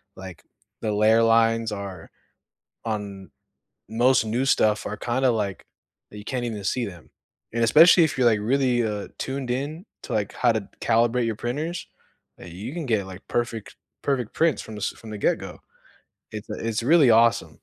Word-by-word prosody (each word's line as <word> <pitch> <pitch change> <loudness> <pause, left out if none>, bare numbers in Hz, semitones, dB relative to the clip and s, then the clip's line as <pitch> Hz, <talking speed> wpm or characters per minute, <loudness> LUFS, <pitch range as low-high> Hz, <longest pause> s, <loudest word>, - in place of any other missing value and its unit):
like, 95 -3 -10 0.4
the 110 - -1
layer 110 +2 +4
lines 115 0 +3
are 100 -4 -7 0.8
on 100 -5 -5 0.6
most 120 +1 +3
new 115 +4 -1
stuff 105 -5 +2
are 105 - -4
kinda, 125 +1 +1
like 100 -5 -3 0.5
that 105 - -10
you 105 - -12
can't 125 -1 -3
even 105 -4 -5
see 120 +4 -1
them. 90 -5 -11 0.4
And 115 0 0
especially 165 +8 +7
if 145 - -4
you're, 125 -2 +4
like, 110 -3 +3
really, 125 +1 +1
uh, 105 -2 -3
tuned 135 -1 -4
in 150 - -4 0.2
to, - - -6
like, 105 -2 -1
how 120 -2 +2
to 110 -3 -3
calibrate 120 +1 +2
your 110 - -2
printers, 155 +8 -4 0.5
eh, - - -11
you 100 - -7
can 170 -4 -4
get, 110 -5 0
like, 95 +2 -11
perfect 120 -2 -3 0.3
perfect 130 -6 -1
prints 160 -4 +1
from 110 - -9
this 105 - -2
from 110 - -13
the 105 - -5
get - - +1
go. - - -9 0.7
It's 110 +1 -8
it's 110 +1 -3
really 145 -2 +5
awesome. 115 +1 +3
115 Hz, 175 wpm, -24 LUFS, 105-125 Hz, 0.8 s, especially